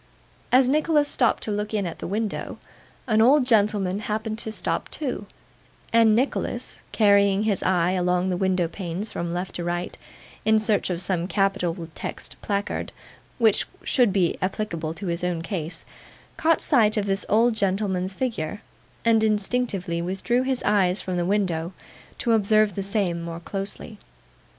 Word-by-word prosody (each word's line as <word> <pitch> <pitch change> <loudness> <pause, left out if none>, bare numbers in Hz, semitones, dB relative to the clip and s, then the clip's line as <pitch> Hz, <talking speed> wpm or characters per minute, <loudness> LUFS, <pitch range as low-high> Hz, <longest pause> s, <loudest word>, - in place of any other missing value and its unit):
As 255 0 +5
Nicholas 300 +1 +2
stopped 245 -4 +1
to 215 - -1
look 210 +1 -2
in 205 -2 0
at 170 - -6
the - - -5
window, 210 +3 -3 0.5
an 220 -3 +3
old 260 +3 +5
gentleman 205 -5 +2
happened 215 +1 -3
to 220 - -2
stop - - -2
too; 255 -8 -3 0.7
and 225 -2 +5
Nicholas, 255 +5 -1
carrying 200 -1 +4
his 210 -4 0
eye 180 -1 +2
along 180 0 +1
the - - 0
window 185 -1 +1
panes 185 +3 -5
from 170 0 -3
left 180 +2 -4
to 175 - -4
right 175 +1 -3 0.5
in 220 0 +4
search 215 -2 +1
of 180 0 -2
some 180 -2 0
capital 195 -4 0
text - - -7
placard 200 -1 -2 0.5
which 220 -3 +3 0.2
should 245 -5 +3
be 185 -3 +1
applicable 170 -5 -3
to 200 - -7
his 170 -1 -2
own 175 -2 -1
case, 165 -1 -4 0.5
caught 325 0 +2
sight 220 -5 +3
of 205 - +1
this 195 0 0
old 230 +3 +4
gentleman's 190 -2 0
figure, 210 -6 -3 0.4
and 225 -1 +4
instinctively 205 -5 0
withdrew 195 +8 0
his 260 -1 -1
eyes 195 -2 +2
from 185 - -4
the 175 0 0
window, 180 -4 0 0.4
to 235 - 0
observe 215 -1 +3
the 195 - -3
same 195 -4 0
more 170 0 -6
closely. 200 +3 -6
200 Hz, 160 wpm, -24 LUFS, 180-220 Hz, 0.7 s, As